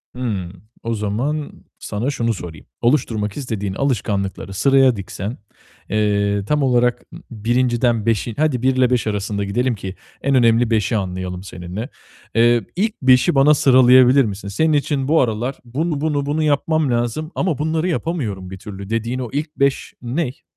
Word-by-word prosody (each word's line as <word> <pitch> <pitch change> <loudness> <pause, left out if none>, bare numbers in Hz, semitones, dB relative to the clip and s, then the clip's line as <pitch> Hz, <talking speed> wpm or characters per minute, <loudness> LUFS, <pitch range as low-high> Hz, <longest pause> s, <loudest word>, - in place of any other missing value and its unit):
Hımm. 100 -6 -4 0.2
O 115 - -1
zaman 120 +8 -2 0.3
sana 115 +7 -3
şunu 115 -4 0
sorayım: 85 -5 -9 0.2
Oluşturmak 115 -5 0
istediğin 105 -8 -3
alışkanlıkları 100 -7 -2
sıraya 135 +2 +4
diksen, 100 +3 -6 0.5
eee, 100 -1 +1
tam 150 +4 +1
olarak 125 -1 +2
ı - - -8
1'inciden 120 0 +1
5'i 115 0 0
hadi, 145 -6 +1
1 130 0 +2
ile 130 -1 +3
5 125 -3 0
arasında 100 -1 -2
gidelim 120 +5 0
ki 95 -1 -7 0.3
en 140 0 +1
önemli 115 -1 +4
5'i 110 0 +1
anlayalım 90 -1 -4
seninle. 95 +6 -7 0.5
Eee, 120 0 +4
ilk 215 +4 -1
5'i 130 +5 +4
bana 140 +3 +6
sıralayabilir 130 -1 +6
misin? 100 -1 -5
Senin 155 +11 +1
için 145 -2 0
bu 160 +2 +4
aralar 120 +2 -1
"Bunu, 145 +5 -2
bunu, 145 -2 0
bunu 150 +2 0
yapmam 150 -1 +1
lazım 120 +7 -1
ama 175 -7 0
bunları 160 +3 -1
yapamıyorum 130 - -3
bir 95 - -8
türlü." 100 0 -9
dediğin 115 +3 -2
o 125 - -4
ilk 150 +1 -3
5 140 0 0
ney? 130 +3 -3
120 Hz, 160 wpm, -20 LUFS, 105-140 Hz, 0.5 s, bana